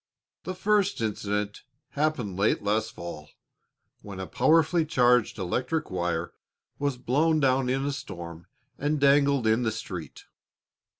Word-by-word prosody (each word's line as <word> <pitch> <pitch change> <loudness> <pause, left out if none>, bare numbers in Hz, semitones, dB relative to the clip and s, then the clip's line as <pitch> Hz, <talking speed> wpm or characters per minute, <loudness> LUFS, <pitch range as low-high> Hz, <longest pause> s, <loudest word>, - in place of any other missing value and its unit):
The 185 - -4
first 205 +1 +1
incident 105 -2 -2 0.3
happened 140 -10 -1
late 100 +2 +1
last 105 +2 0
fall, 75 -3 -8 0.7
when 100 -2 -9
a 95 - -3
powerfully 160 - +3
charged 125 -7 +3
electric 125 - -2
wire 85 -2 -2 0.5
was 140 -3 -1
blown 155 +6 +2
down 130 -2 +2
in 135 +2 0
a 145 - 0
storm 85 - -8 0.3
and 150 +1 0
dangled 140 -2 +4
in 110 +2 +3
the 115 -2 0
street. 95 -6 -7
125 Hz, 130 wpm, -27 LUFS, 100-145 Hz, 0.7 s, dangled